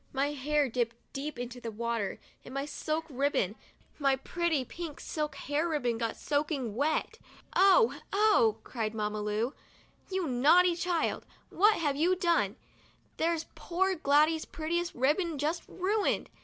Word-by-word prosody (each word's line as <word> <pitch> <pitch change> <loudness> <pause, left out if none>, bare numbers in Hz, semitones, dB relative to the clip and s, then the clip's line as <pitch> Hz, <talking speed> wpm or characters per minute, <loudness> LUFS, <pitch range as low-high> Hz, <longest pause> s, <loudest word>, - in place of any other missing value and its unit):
My 280 +2 +1
hair 295 +1 +1
dipped 235 -1 -1 0.2
deep 280 0 -4
into 245 0 -6
the 230 - -4
water 230 -1 -2 0.3
and 255 - -10
my 275 +1 -1
silk 310 +2 -3
ribbon, 275 - 0 0.5
my 275 -2 +3
pretty 320 0 -1
pink 330 +2 -7
silk 300 -1 -3
hair 300 +4 -1
ribbon, 245 -7 0
got 230 -2 -2
soaking 285 -6 -1
wet. 295 +5 0 0.2
" - - -22
Oh! 395 +5 +5
Oh! 430 +2 +4
' - - -33
cried 225 -3 -3
Mamma 210 0 -2
Lu, 210 +5 -1 0.3
" - - -33
you 375 -2 0
naughty 325 +8 +5
child, 350 -1 -1 0.2
what 420 +3 +5
have 290 -6 0
you 350 +5 +3
done? 335 - +1 0.6
There's 325 0 0
poor 380 +2 0
Gladys's 310 0 +3
prettiest 340 +2 -2
ribbon 300 +6 +1
just 310 +4 -1
ruined 400 +3 0
295 Hz, 155 wpm, -30 LUFS, 250-340 Hz, 0.6 s, Oh